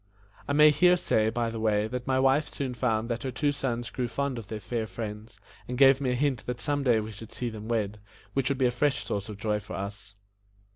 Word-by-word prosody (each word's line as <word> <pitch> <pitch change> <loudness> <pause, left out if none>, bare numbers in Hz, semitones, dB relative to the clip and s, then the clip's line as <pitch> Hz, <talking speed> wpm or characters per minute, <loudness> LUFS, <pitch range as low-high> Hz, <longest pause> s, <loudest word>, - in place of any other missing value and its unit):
I 145 - 0
may 150 +1 +7
here 180 +5 +5
say, 110 -10 +2
by 115 0 -1
the 115 - -5
way, 105 -1 +2
that 125 +2 -5
my 130 0 +2
wife 135 +3 +3
soon 135 -3 -4
found 115 -2 0
that 115 -1 -2
her 135 - -3
two 145 +3 0
sons 120 -4 -3
grew 125 -2 -2
fond 130 +2 -2
of 110 - -10
their 110 0 -5
fair 115 0 -3
friends, 105 -1 -7 0.3
and 125 - -4
gave 135 0 +6
me 130 - 0
a 125 - +1
hint 135 -3 0
that 125 -1 -3
some 145 +4 0
day 120 -5 +3
we 110 +1 -5
should 110 +1 -10
see 120 -2 -3
them 110 0 -8
wed, 105 -3 -1 0.3
which 135 -1 +1
would 140 - 0
be 130 - +2
a 125 - +3
fresh 140 +3 0
source 100 +1 -3
of 105 - -7
joy 105 0 0
to 100 - -10
us. 100 +1 -7
120 Hz, 250 wpm, -28 LUFS, 110-135 Hz, 0.3 s, may